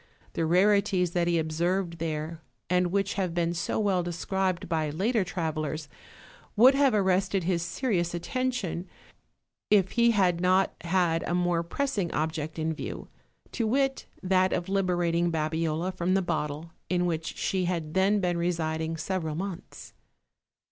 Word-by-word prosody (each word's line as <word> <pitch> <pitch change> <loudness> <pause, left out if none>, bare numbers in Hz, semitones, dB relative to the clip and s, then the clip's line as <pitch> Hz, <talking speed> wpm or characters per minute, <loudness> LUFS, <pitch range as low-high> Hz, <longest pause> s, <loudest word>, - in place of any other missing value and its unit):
The 165 - 0
rarities 185 0 +3
that 175 -1 0
he 170 -1 +2
ob 160 0 -2
served 170 +1 -1
there, 160 0 -3 0.3
and 180 0 +3
which 200 +2 0
have 185 -4 -2
been 170 0 +1
so 165 -1 -2
well 195 -4 +2
described 185 +2 -2
by 160 -2 0
later 200 +8 +1
travelers, 155 -4 -3 0.7
would 250 +5 +7
have 275 -4 +3
arrested 190 -1 +2
his 175 -1 0
serious 175 -4 -1
attention, 235 -3 -2 0.8
if 195 -3 +4
he 235 -1 +4
had 185 -6 +2
not 185 +1 +3
had 170 -2 +1
a 175 - 0
more 175 -1 +1
pressing 200 0 -2
object 155 0 -2
in 160 0 -1
view; 155 - -6 0.4
to 230 -2 -1
wit, 270 +3 0 0.2
that 185 0 +3
of 175 +1 -2
liberating 175 -3 +1
Babiola 160 +2 -1
from 185 0 0
the 195 - +2
bottle, 155 -1 -3 0.2
in 180 -1 +1
which 165 -2 -3
she 185 -2 0
had 165 -3 -2
then 195 +3 +3
been 175 -2 0
residing 160 -2 -1
several 160 -1 -2
months. 190 +1 -7
175 Hz, 150 wpm, -28 LUFS, 165-195 Hz, 0.8 s, would